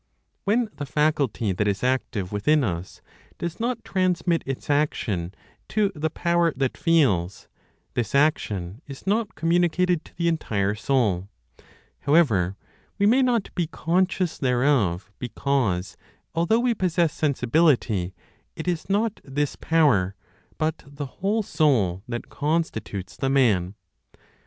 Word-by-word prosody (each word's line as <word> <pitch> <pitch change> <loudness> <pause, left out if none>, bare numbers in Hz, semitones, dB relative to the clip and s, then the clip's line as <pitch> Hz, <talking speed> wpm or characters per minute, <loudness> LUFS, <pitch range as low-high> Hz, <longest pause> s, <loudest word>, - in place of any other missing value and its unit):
When 225 +4 +2
the 145 - -5
faculty 140 -8 +1
that 105 +3 0
is 100 +1 -1
active 125 -7 -1
within 140 +9 +2
us 90 -4 -4 0.3
does 170 -1 -4
not 235 0 -2
transmit 180 -2 +1
its 135 -1 -4
action 115 - 0 0.4
to 210 -2 +1
the 160 -1 -1
power 170 +1 +1
that 135 -1 -1
feels, 105 - +1 0.5
this 120 +1 -2
action 105 - +1
is 140 -2 -10
not 210 +2 0
communicated 175 0 +2
to - - -18
the 170 0 0
entire 105 -12 0
soul; 105 -5 0 0.7
however, 110 - +3 0.4
we 200 - +2
may 245 +6 +5
not 240 -5 +1
be 175 -3 -1
conscious 180 +2 0
thereof 120 -9 +1
because, 120 -7 -1 0.4
although 170 +8 +2
we 245 0 +2
possess 175 -5 +1
sensibility, 125 - +1 0.4
it 160 - -6
is 175 -1 -2
not 210 +2 0
this 140 +1 -2
power, 130 - +2 0.4
but 155 0 -1
the 145 +1 -6 0.2
whole 210 +3 +1
soul 115 - +2
that 120 -1 -5
constitutes 145 - -2
the 135 +1 0
man. 105 -9 +2
145 Hz, 130 wpm, -24 LUFS, 105-170 Hz, 0.7 s, may